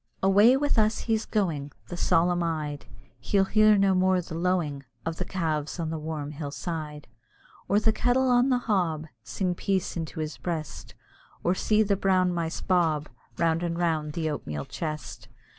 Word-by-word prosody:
Away 205 Hz, +7 st, +6 dB
with 285 Hz, -4 st, +1 dB
us, 215 Hz, +1 st, +2 dB
he's 225 Hz, -1 st, -1 dB
going, 155 Hz, -9 st, -1 dB, 0.2 s
The 175 Hz, -, -5 dB
solemn 175 Hz, 0 st, +2 dB
eyed; 155 Hz, -3 st, -3 dB, 0.3 s
He'll 195 Hz, -1 st, +2 dB
hear 215 Hz, +1 st, +5 dB
no 195 Hz, -1 st, +4 dB
more 185 Hz, 0 st, +3 dB
the 175 Hz, -1 st, -7 dB
lowing 165 Hz, -5 st, -1 dB, 0.2 s
Of 165 Hz, 0 st, -3 dB
the -, -, -3 dB
calves 160 Hz, -3 st, -2 dB
on 160 Hz, -1 st, -2 dB
the 160 Hz, -, -3 dB
warm 150 Hz, -2 st, -4 dB
hill 145 Hz, -1 st, -5 dB
side. 150 Hz, -1 st, -5 dB, 0.6 s
Or 205 Hz, -, +4 dB
the 220 Hz, +1 st, +2 dB
kettle 250 Hz, +3 st, +2 dB
on 245 Hz, +2 st, +4 dB
the 255 Hz, -, +3 dB
hob 180 Hz, -10 st, 0 dB, 0.2 s
Sing 180 Hz, -, -2 dB
peace 190 Hz, +1 st, -1 dB
into 160 Hz, -2 st, -5 dB
his 155 Hz, -1 st, -4 dB
breast; 160 Hz, -5 st, -5 dB, 0.5 s
Or 175 Hz, -, +3 dB
see 215 Hz, +3 st, +2 dB
the 200 Hz, -1 st, +1 dB
brown 185 Hz, -2 st, +2 dB
mice 165 Hz, -1 st, -3 dB
bob 160 Hz, -5 st, +1 dB, 0.3 s
Round 165 Hz, 0 st, +1 dB
and 170 Hz, -1 st, -2 dB
round 160 Hz, -3 st, 0 dB
the 160 Hz, 0 st, -2 dB
oatmeal 75 Hz, -, -4 dB
chest. 155 Hz, -2 st, -6 dB
175 Hz, 175 wpm, -27 LUFS, 155-195 Hz, 0.6 s, Away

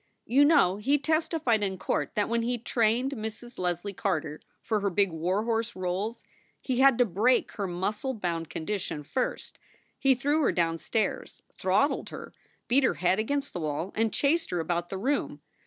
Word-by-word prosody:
"You 275 Hz, +5 st, +5 dB
know 280 Hz, -, +4 dB
he 270 Hz, +8 st, +2 dB
testified 315 Hz, -6 st, +1 dB
in 190 Hz, -2 st, -1 dB
court 190 Hz, -, -2 dB
that 210 Hz, -, +1 dB
when 235 Hz, 0 st, 0 dB
he 240 Hz, +1 st, -1 dB
trained 235 Hz, +2 st, +1 dB
Mrs. 235 Hz, 0 st, -7 dB
Leslie 180 Hz, +2 st, -2 dB
Carter 155 Hz, -6 st, -2 dB, 0.2 s
for 215 Hz, -2 st, 0 dB
her 200 Hz, 0 st, 0 dB
big 195 Hz, 0 st, +2 dB
war 180 Hz, +6 st, -1 dB
horse 230 Hz, 0 st, -1 dB
roles, 185 Hz, +5 st, -3 dB, 0.4 s
he 255 Hz, -2 st, -2 dB
had 270 Hz, -2 st, +6 dB
to 245 Hz, -, +4 dB
break 225 Hz, +6 st, +2 dB
her 200 Hz, -3 st, -3 dB
muscle 205 Hz, +9 st, -2 dB
bound 170 Hz, -5 st, -3 dB
condition 165 Hz, -3 st, -4 dB
first. 255 Hz, -, -3 dB, 0.4 s
He 270 Hz, -1 st, +4 dB
threw 290 Hz, +5 st, +1 dB
her 285 Hz, -, +3 dB
down 165 Hz, -1 st, 0 dB
stairs, 215 Hz, +5 st, -2 dB, 0.2 s
throttled 195 Hz, +11 st, +1 dB
her, -, -, -9 dB, 0.3 s
beat 265 Hz, +3 st, +4 dB
her 255 Hz, -, +2 dB
head 185 Hz, +3 st, +1 dB
against 280 Hz, +5 st, -1 dB
the -, -, -4 dB
wall, 155 Hz, +4 st, -3 dB
and 225 Hz, 0 st, +1 dB
chased 325 Hz, +4 st, +1 dB
her 175 Hz, -, -1 dB
about 175 Hz, +1 st, -2 dB
the 195 Hz, -, -4 dB
room. 270 Hz, +9 st, -1 dB
215 Hz, 180 wpm, -28 LUFS, 180-255 Hz, 0.4 s, had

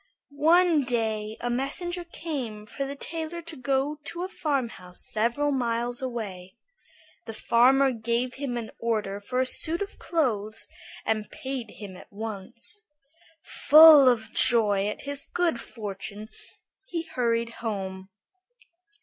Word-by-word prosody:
One 335 Hz, -1 st, +5 dB
day 220 Hz, -3 st, -1 dB
a 245 Hz, -, -1 dB
message 290 Hz, +8 st, -2 dB
came 250 Hz, -10 st, -5 dB
for 275 Hz, +5 st, -4 dB
the 280 Hz, -, -5 dB
tailor 330 Hz, +3 st, -5 dB
to 330 Hz, -1 st, -6 dB
go 275 Hz, +2 st, 0 dB
to 345 Hz, +2 st, -4 dB
a -, -, -2 dB
farmhouse 240 Hz, -, -3 dB
several 235 Hz, +7 st, +1 dB
miles 240 Hz, -1 st, -1 dB
away. 205 Hz, -8 st, -5 dB, 0.7 s
The 225 Hz, -, -7 dB
farmer 265 Hz, +5 st, +4 dB
gave 235 Hz, +2 st, -1 dB
him 265 Hz, -3 st, -4 dB
an 230 Hz, -2 st, -5 dB
order 210 Hz, -4 st, -1 dB
for 250 Hz, +5 st, -3 dB
a 260 Hz, -, +3 dB
suit 320 Hz, +6 st, +1 dB
of 405 Hz, 0 st, -6 dB
clothes, 225 Hz, -9 st, -1 dB, 0.4 s
and 215 Hz, -1 st, -1 dB
paid 260 Hz, -4 st, -5 dB
him 200 Hz, -3 st, -10 dB
at -, -, -14 dB
once. 220 Hz, -, -6 dB, 0.6 s
Full 305 Hz, -3 st, +8 dB
of 220 Hz, -3 st, -1 dB
joy 210 Hz, -5 st, +3 dB
at 210 Hz, -, -4 dB
his 285 Hz, 0 st, -3 dB
good 335 Hz, -9 st, 0 dB
fortune, 210 Hz, -1 st, -6 dB, 0.6 s
he 335 Hz, -7 st, -3 dB
hurried 235 Hz, -6 st, 0 dB
home. 190 Hz, -4 st, -4 dB
240 Hz, 130 wpm, -27 LUFS, 215-285 Hz, 0.7 s, Full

